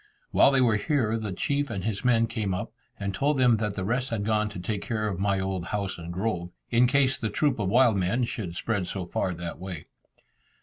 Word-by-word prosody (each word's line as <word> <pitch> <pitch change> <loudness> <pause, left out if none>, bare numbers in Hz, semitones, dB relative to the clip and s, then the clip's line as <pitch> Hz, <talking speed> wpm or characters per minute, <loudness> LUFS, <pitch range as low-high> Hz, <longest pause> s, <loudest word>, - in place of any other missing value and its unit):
While - - +6
they 135 -1 +3
were 115 -4 +4
here, 115 -3 +1
the 105 -2 -4
chief 140 +9 -1
and 100 -5 -4
his 105 -1 -2
men 115 -2 +4
came 110 -5 -2
up, 90 - -4 0.3
and 100 -1 -2
told 140 +7 +1
them 125 -3 +5
that 105 -2 -2
the 95 - -3
rest 125 +5 0
had 105 -3 -2
gone 110 0 +1
to 100 - -8
take 100 +3 -3
care 110 -2 -2
of 95 -4 -3
my 100 -1 +1
old 95 -2 -2
house 100 -2 -3
and 85 0 -6
grove, 90 -2 -2 0.2
in 120 +2 +5
case 135 0 +2
the 110 - -1
troop 130 +4 +1
of 100 -3 0
wild 120 -1 +5
men 95 +7 +1
should 105 -7 -4
spread 100 -2 -1
so 95 -1 -3
far 90 +1 -2
that 85 0 -6
way. 90 -4 -6
105 Hz, 230 wpm, -27 LUFS, 95-120 Hz, 0.3 s, While